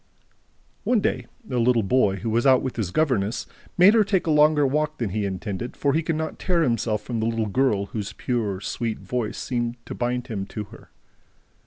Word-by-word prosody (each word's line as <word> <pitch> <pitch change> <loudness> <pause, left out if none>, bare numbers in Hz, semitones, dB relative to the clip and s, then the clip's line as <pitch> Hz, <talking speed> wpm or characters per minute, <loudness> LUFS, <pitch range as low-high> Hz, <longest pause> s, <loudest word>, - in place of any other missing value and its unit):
One 245 -3 +3
day, - - -1 0.2
a 125 - 0
little 120 -1 +3
boy, 100 -1 +2
who 115 - -2
was 120 +4 +2
out 130 -1 +5
with 130 - -3
his 110 -6 -2
governess, 115 - 0 0.3
made 185 +4 +7
her 225 -2 +5
take 195 -2 0
a 160 - +1
longer 150 -1 +5
walk 150 +3 0
than 115 -6 -2
he 105 +1 -1
intended, 100 +4 -4
for 140 -1 +1
he 160 - +2
could 165 0 -1
not 160 0 -4
tear 175 -3 +1
himself 115 -5 0
from 120 -2 -3
the 110 - 0
little 115 -1 0
girl 105 -2 +1
whose 105 0 -5
pure, 110 -6 -2
sweet 110 +2 -3
voice 120 -4 -3
seemed 120 -1 -2
to - - -6
bind 125 0 -2
him 100 -6 -4
to 105 - -5
her. - - -14
120 Hz, 205 wpm, -24 LUFS, 110-150 Hz, 0.3 s, made